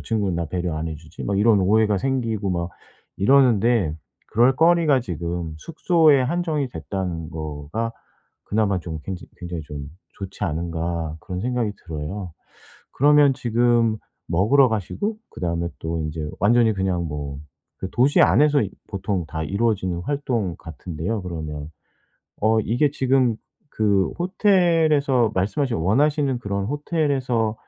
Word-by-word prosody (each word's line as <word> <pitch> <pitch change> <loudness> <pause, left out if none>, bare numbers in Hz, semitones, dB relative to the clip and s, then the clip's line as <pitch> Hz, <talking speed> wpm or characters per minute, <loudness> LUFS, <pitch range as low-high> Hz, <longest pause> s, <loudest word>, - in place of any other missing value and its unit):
친구는 100 -6 -1
나 85 - -2
배려 85 0 -2
안 80 +1 -3
해주지?' 80 -1 -8
막 100 -1 -1
이런 105 0 +5
오해가 105 +1 +3
생기고 115 -5 -1
막 85 -1 -2 0.5
이러는데 115 - +3 0.3
그럴 120 +4 +4
거리가 165 -4 +4
지금 85 -4 -4
숙소에 160 - +3
한정이 155 -1 -1
됐다는 85 -1 -4
거가 80 +9 -4 0.5
'그나마 105 -2 +1
좀 80 -2 -6
굉장히 95 -2 -6
굉장히 85 -2 -5
좀 70 -1 -7 0.3
좋지 100 +1 -5
않은가?' 85 -1 -3
그런 90 +3 -5
생각이 120 -2 -1
들어요. 85 +3 -5 0.6
그러면 145 0 +5
지금 120 -2 +2 0.3
먹으러 110 +11 +4
가시고 155 - -2
그다음에 85 -1 -2
또 80 0 -3
인제 75 0 -4
완전히 115 +2 +4
그냥 95 -3 -1
뭐 70 -2 -5 0.4
그 95 - -3
도시 130 +4 +3
안에서 150 0 +5
이 100 - -3 0.2
보통 95 -2 -2
다 80 0 -4
이루어지는 95 -2 0
활동 125 - -1
같은데요 85 +6 -5
그러면. 80 -4 -6 0.7
어 110 +1 +3
이게 120 +7 +1
지금 130 -4 +2 0.3
그 100 -3 +2
호텔에서 165 - +3
말씀하신 115 +7 0
원하시는 135 - +2
그런 100 -3 -3
호텔에서랑 135 -6 0
105 Hz, 300 characters per minute, -23 LUFS, 85-130 Hz, 0.7 s, 이런